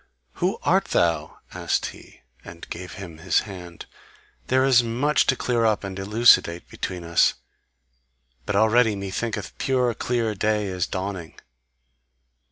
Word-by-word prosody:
"Who - - +1
art - - +3
thou?" 80 -3 0
asked - - -1
he, - - -17 0.2
and 85 0 -11
gave 90 -1 -7
him 90 -6 -9
his 85 0 +2
hand, 90 -4 -10 0.6
"there 130 +1 +3
is 125 -3 +5
much 125 +6 +1
to 130 - +3
clear 120 -2 0
up 110 -3 +1
and 95 0 -6
elucidate 100 -4 +4
between 90 -2 -5
us, 85 0 +3 1.1
but 100 - -1
already 110 +1 +4
methinketh 100 +3 -4
pure 125 -3 +1
clear 115 -1 -1
day 105 +1 0
is 90 -2 -2
dawning." 95 -3 -5
100 Hz, 135 wpm, -24 LUFS, 90-115 Hz, 1.1 s, is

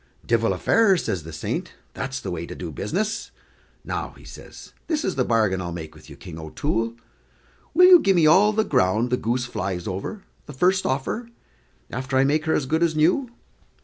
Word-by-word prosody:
"Divil - - +2
a - - -4
fairer," 220 -5 +4
says 95 - -2
the 80 +1 -10
saint, 80 - -4 0.2
"that's 135 0 -4
the - - -5
way 85 -1 -4
to - - -8
do 85 -3 -6
business. 205 - -2 0.6
Now," - - -4
says - - -12
he, - - -36
"this 310 -2 -1
is 190 - 0
the 130 - +1
bargain 110 -6 +1
I'll 85 -1 -4
make 80 -2 -7
with 80 +1 -16
you, 70 - -10
King 80 +2 -10
O'Toole: 115 - -2 0.8
will 360 - +8
you 365 -1 +9
gi' 195 - +3
me 170 -4 +4
all 190 +7 +6
the 215 +1 +1
ground 110 - +1
the 125 - +2
goose 120 +2 -1
flies 95 -6 -4
over, 100 - -5 0.2
the 145 - -8
first 185 +7 +2
offer, 140 - -2 0.6
after 130 +1 -2
I 130 - +5
make 150 +3 +1
her 160 - +2
as 140 - 0
good 160 +5 0
as 165 -2 +2
new?" 175 - +2
130 Hz, 205 wpm, -23 LUFS, -, 0.8 s, you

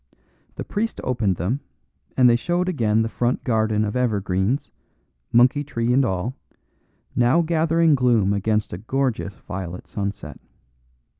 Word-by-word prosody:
The - - -5
priest 225 +2 -3
opened 115 -7 0
them, 95 - -1 0.6
and 125 -1 +6
they 120 - +5
showed 175 +7 0
again 110 -10 +1
the - - -1
front 120 +2 -1
garden 110 -2 +1
of 105 - -4
evergreens, 110 +2 0 0.6
monkey 125 +5 +4
tree 120 -4 -1
and 135 +2 +4
all, 100 +2 -1 0.8
now 125 +8 +3
gathering 165 0 +2
gloom 120 -7 +3
against 105 +1 0
a 85 - -5
gorgeous 120 -3 -2
violet 90 -2 -7
sunset. 100 -3 -5
120 Hz, 135 wpm, -23 LUFS, 105-135 Hz, 0.8 s, and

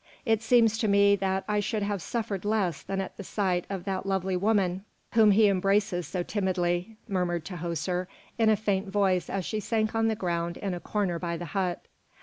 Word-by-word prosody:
It 225 -2 +2
seems 225 -2 +4
to 220 - +1
me 200 0 +5
that 190 0 -1
I 210 0 +1
should 210 +1 -1
have 200 -2 -2
suffered 215 -2 -3
less 205 -7 0
than 195 0 -3
at 190 - -7
the 200 - -6
sight 185 -3 -1
of 195 -3 -4
that 195 0 -3
lovely 190 -1 0
woman 190 -1 +1 0.3
whom 220 -2 +6
he 210 +1 +6
embraces 195 -2 +1
so 180 -2 -2
timidly," 185 +1 -1
murmured 175 -5 -1
Tahoser 175 0 -3 0.3
in 225 -1 +4
a 215 - +5
faint 200 -1 -1
voice 195 -2 +1
as 195 -3 -2
she 215 - -2
sank 215 0 0
on 225 0 +2
the 220 - +1
ground 170 -4 -2
in 195 -2 -3
a 175 - -4
corner 185 -3 -1
by 170 -1 -3
the 175 - -6
hut. 180 +2 -2
195 Hz, 200 wpm, -28 LUFS, 180-210 Hz, 0.3 s, whom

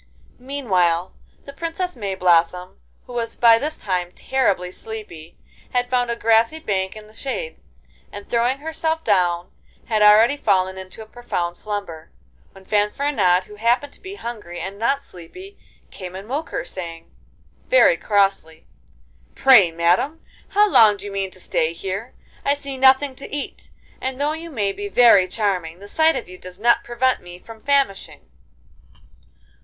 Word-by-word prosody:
Meanwhile 190 -10 0 0.3
the 280 - -10
Princess 335 +3 -4
Mayblossom, 180 -4 +1 0.3
who 245 - -11
was 230 -1 -3
by 230 -1 +6
this 305 +4 -3
time 180 -3 -2
terribly 200 -9 0
sleepy, 185 -7 -9 0.4
had 245 0 0
found 245 -1 +1
a 235 - -1
grassy 230 +5 +3
bank 190 -10 -2
in 215 -1 -11
the 215 - -19
shade, 220 -10 -5 0.5
and 205 0 -9
throwing 240 +3 +1
herself 320 +2 -2
down 180 -4 +1 0.3
had 220 -2 0
already 215 +6 +6
fallen 190 -7 +1
into 190 +3 -9
a - - -14
profound 195 -7 -4
slumber, 200 -7 -6 0.4
when 195 0 -17
Fanfaronade, 210 -3 +1
who 210 +2 -14
happened 245 +6 +1
to - - -16
be 390 0 -8
hungry 210 - -7
and 190 +4 -6
not 275 +5 0
sleepy, 365 - -13 0.3
came 185 -1 -8
and 195 +2 -8
woke 290 +6 -3
her - - -3
up, - - -11
saying, 165 -3 -8 0.6
very - - +5
crossly: 195 - 0 0.7
'Pray, 235 -11 +6
madam, 175 - +1 0.3
how 415 +1 +3
long 220 - +6
do - - -10
you 205 - -6
mean 195 -1 -2
to 185 - -15
stay 160 -2 -1
here? 195 +7 -6 0.3
I 280 - +2
see 280 -1 -6
nothing 265 +1 +4
to - - -10
eat, 290 -1 -6 0.3
and 260 0 -3
though 295 +2 0
you 330 +1 -7
may 210 -9 -1
be 410 - -6
very 235 - +6
charming, 185 -5 -2
the 200 +2 -12
sight 320 +8 +3
of - - -4
you 185 0 -12
does 180 0 -11
not 235 +3 +3
prevent 250 +2 0
me 175 0 -11
from 220 +4 -13
famishing. 275 -7 0
215 Hz, 160 wpm, -21 LUFS, 185-265 Hz, 0.7 s, by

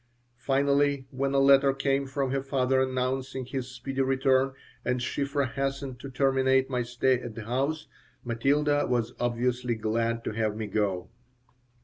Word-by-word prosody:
Finally 140 +2 +2
when 135 +1 -1
a 140 - +1
letter 135 0 +6
came 135 0 0
from 135 -1 -2
her 135 0 0
father 130 -1 +1
announcing 130 0 -2
his 130 0 -4
speedy 130 +2 -4
return 135 0 +2 0.3
and 125 0 0
Shiphrah 140 +3 -1
hastened 135 -2 -3
to 135 - -7
terminate 135 0 +2
my 125 -1 0
stay 120 +1 +1
at 115 -3 -7
the 110 -2 -7
house, 140 +6 -1 0.4
Matilda 145 +5 +1
was 120 -1 0
obviously 120 0 0
glad 115 +1 -1
to - - -3
have 110 -1 -1
me 110 0 -3
go. 100 -3 -1
130 Hz, 150 wpm, -28 LUFS, 120-135 Hz, 0.4 s, letter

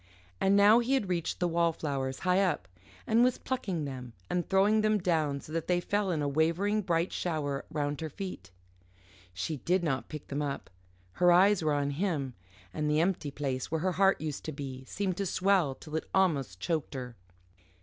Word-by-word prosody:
And 195 +1 +3
now 205 +3 +7
he 250 +3 +1
had 210 -8 -1
reached 170 -3 -1
the 180 - +2
wallflowers 155 -6 -1
high 185 +1 +3
up, 160 - 0 0.4
and 225 +2 +4
was 250 0 +3
plucking 190 - -3
them 125 -3 -7 0.2
and 175 -2 -1
throwing 205 +3 +4
them 215 0 +3
down 155 -7 0
so 155 - -11
that 165 -1 -2
they 180 -1 +2
fell 205 +2 0
in 160 -4 0
a - - 0
wavering 170 +9 +1
bright 170 -2 0
shower 145 -5 -2
round 145 -1 -2
her 160 - -3
feet. 165 - -7 0.8
She 95 - -3
did 175 +7 +1
not 135 -5 -1
pick 150 -1 -8
them 145 +1 -2
up. 140 -7 -4 0.4
Her 175 - +4
eyes 190 +2 +5
were 155 -2 +1
on 145 0 0
him; 145 -5 -1 0.4
and 150 -1 -1
the 150 +1 +3
empty 170 -3 0
place 135 -3 -3
where 160 0 -1
her 185 +1 +1
heart 195 +1 +3
used 150 -2 -4
to 155 - -3
be 135 -3 -6
seemed 185 +3 -2
to 200 - -1
swell 185 -7 +2
till 155 +2 -9
it 160 - -3
almost 140 - +1
choked 155 - -2
her. 125 -2 -6
165 Hz, 195 wpm, -30 LUFS, 145-190 Hz, 0.8 s, now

